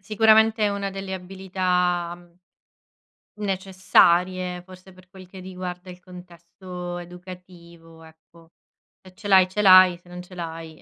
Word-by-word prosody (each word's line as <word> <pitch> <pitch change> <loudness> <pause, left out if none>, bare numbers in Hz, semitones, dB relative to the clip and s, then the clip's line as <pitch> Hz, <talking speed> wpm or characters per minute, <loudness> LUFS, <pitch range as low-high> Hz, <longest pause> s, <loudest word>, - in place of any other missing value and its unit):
Sicuramente 220 +2 +3
è 205 - +3
una 200 -1 -4
delle 195 0 -7
abilità, 180 -2 -2
mhmm 175 0 -22 1.0
necessarie, 185 -2 +1
forse 185 +1 -16
per 185 0 -20
quel 190 -1 -14
che 185 +1 -13
riguarda 180 0 -8
il 180 - -12
contesto 180 0 -10
educativo, 175 -2 -13
ecco. 165 +1 -21 0.5
Se 185 -1 -16
ce 205 - -12
l'hai, 190 -2 +5
ce 210 +3 -4
l'hai, 185 -2 +7
se 175 - -24
non 180 0 -9
ce 180 0 -15
l'hai,, 165 -2 -8
180 Hz, 140 wpm, -23 LUFS, 175-190 Hz, 1.0 s, l'hai